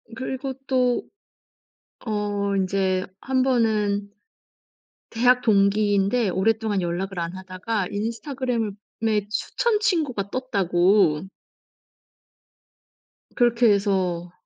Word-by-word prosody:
그리고 265 +2 -4
또 250 -2 +2 1.0
어 205 -2 -1
인제 190 -1 0 0.2
한번은 220 -6 +1 1.0
대학 250 +2 +3
동기인데 205 +1 +2
오랫동안 210 +1 0
연락을 175 +2 -3
안 170 +1 -3
하다가 190 +2 -3
인스타그램을 230 +1 -2 0.3
에 210 -2 +1
추천 425 - 0
친구가 300 - 0
떴다고 190 -7 +2 2.1
그렇게 240 -2 +4
해서 185 -4 -1
210 Hz, 195 characters per minute, -24 LUFS, 195-245 Hz, 2.1 s, 그렇게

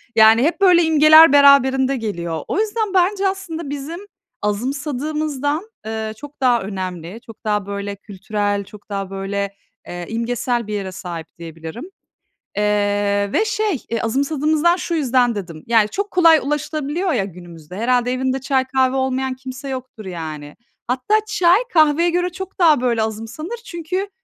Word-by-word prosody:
Yani, 220 +2 +6
hep 345 +6 0
böyle 355 -3 +6
imgeler 310 -1 +7
beraberinde 275 -1 +5
geliyor. 170 -8 -4
O 400 - -1
yüzden 435 -2 -1
bence 385 +2 +2
aslında 340 -6 -4
bizim 290 +5 -5 0.4
azımsadığımızdan, 290 - -2 0.2
eee, 220 0 -4
çok 290 +1 -12
daha 245 -3 +3
önemli. 185 +1 -6
Çok 225 - -14
daha, 210 -2 0
böyle, 200 0 -5
kültürel, 205 0 -3
çok 205 +1 -15
daha, 195 -1 -4
böyle, 200 +1 -3 0.3
eee, 175 0 -6
imgesel 235 0 -2
bir 210 - -4
yere 195 -2 -3
sahip 175 -3 -7
diyebilirim. 165 - -8 0.7
Eee, 205 -1 +1
ve 435 - +2
şey, 425 - -1
eee, 230 - -1
azımsadığımızdan 300 +7 +1
şu 345 -2 -3
yüzden 250 -5 +2
dedim, 170 -6 -7
yani, 225 -2 +3
çok 405 - -3
kolay 330 -3 +6
ulaşılabiliyor 300 +4 -2
ya 205 -7 0
günümüzde, 175 -2 -11
herhâlde 245 +2 +1
evinde 260 +1 -1
çay, 265 -1 +1
kahve 260 0 +1
olmayan 265 0 -1
kimse 260 +1 -8
yoktur 255 -4 -7
yani. 155 -4 -7 0.3
Hatta 255 - 0
çay, 370 -3 +4
kahveye 315 +1 +4
göre 355 +1 0
çok 380 +2 -8
daha 315 -7 +5
böyle 235 -3 +1
azımsanır. 225 - -5
Çünkü, 365 +3 -4
255 Hz, 150 wpm, -20 LUFS, 205-310 Hz, 0.7 s, imgeler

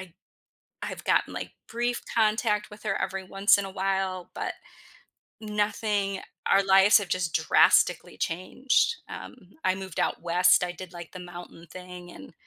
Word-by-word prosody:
I 185 -3 -11 0.7
I've - - -6
gotten - - +2
like, - - -5 0.2
brief 240 +1 -2
contact 215 -1 +1
with 210 0 -13
her 195 -2 -1
every 190 0 -3
once 195 +2 +4
in 200 - -2
a 195 - -6
while, 190 -1 -2
but - - -3 0.9
nothing 210 -2 -1 0.3
our 195 - +5
lives 195 +2 +6
have 200 -3 -5
just 180 -3 -1
drastically - - +3
changed, 255 - +1
um, - - -8 0.3
I 185 - +3
moved 190 0 -8
out - - -1
west, 180 +1 +4
I 175 - -4
did 180 0 -10
like 170 -2 -9
the 185 - -8
mountain 175 -1 -10
thing 180 -1 -10
and 95 - -12
190 Hz, 160 wpm, -27 LUFS, 180-210 Hz, 0.9 s, lives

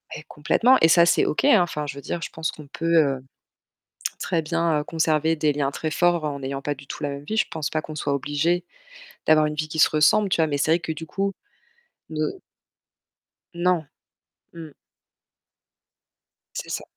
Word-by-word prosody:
Mais 155 - -8
complètement 235 - +3
et 160 - +7
ça 170 +1 +6
c'est - - +3
OK, 155 - 0
hein. 220 -9 +6
Enfin, 150 -4 -2
je 140 -1 -6
veux 140 - -8
dire, 170 - -4
je - - -4
pense 160 0 -3
qu'on 150 -2 -12
peut, 165 +3 -1
heu, 135 -4 +2 1.0
très 165 -2 0
bien, 165 -1 0
heu, - - -5
conserver 160 -1 +1
des 150 -1 +1
liens 140 -1 -1
très 155 +2 -4
forts 175 0 +2
en 140 -2 -3
n'ayant 135 +1 -4
pas 145 0 -2
du 140 0 -14
tout - - -7
la 145 - 0
même 140 +1 -7
vie. 220 - -3
Je - - +2
pense 155 -2 -3
pas 155 - -1
qu'on 155 0 -9
soit 145 -1 -2
obligés 145 +6 0 0.6
d'avoir 155 -1 +5
une 150 - -3
vie 155 0 -3
qui 160 0 -6
se - - +6
ressemble, 195 +7 +4
tu - - +1
vois. 160 - +4
Mais 145 -2 -2
c'est 155 - +1
vrai 170 - +4
que 160 0 -4
du 160 +1 -8
coup 195 +4 -2 0.8
ne 155 -1 -1 1.3
Non. 175 -3 0 0.7
Mmh. 160 -3 -10 1.8
C'est - - -5
ça. - - -4
155 Hz, 200 wpm, -24 LUFS, 145-170 Hz, 1.8 s, et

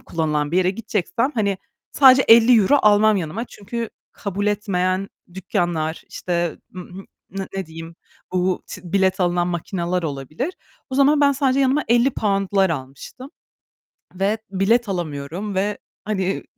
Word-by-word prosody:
kullanılan 150 -3 -2
bir - - +1
yere 185 0 +3
gideceksem, 225 +4 -2
hani, 200 -4 0 0.3
sadece 265 -1 +7
€50 230 +2 +6
almam 210 0 +5
yanıma 185 +5 -3
çünkü 230 +1 -6 0.2
kabul 200 +1 -4
etmeyen 195 -2 0 0.3
dükkânlar, 175 -4 -2
işte, 175 -3 -2 0.2
ım 180 0 -9
hı 195 - -9 0.4
n - - -6
ne 190 - -3
diyeyim, 165 +1 -10 0.4
bu 185 0 0
t - - -9
bilet 190 0 +2
alınan 175 -1 +1
makineler 175 +1 -2
olabilir. 155 - -4 0.4
O - - -4
zaman, 285 +2 +4
ben 285 -1 +5
sadece 275 -1 +1
yanıma 275 +3 +2
£50'lar 205 -6 +2
almıştım 140 - -7 0.9
ve 195 +4 0
bilet 205 +4 +1
alamıyorum 175 +3 -4
ve 200 +2 0 0.3
hani, 195 -2 -2
195 Hz, 135 wpm, -21 LUFS, 175-225 Hz, 0.9 s, sadece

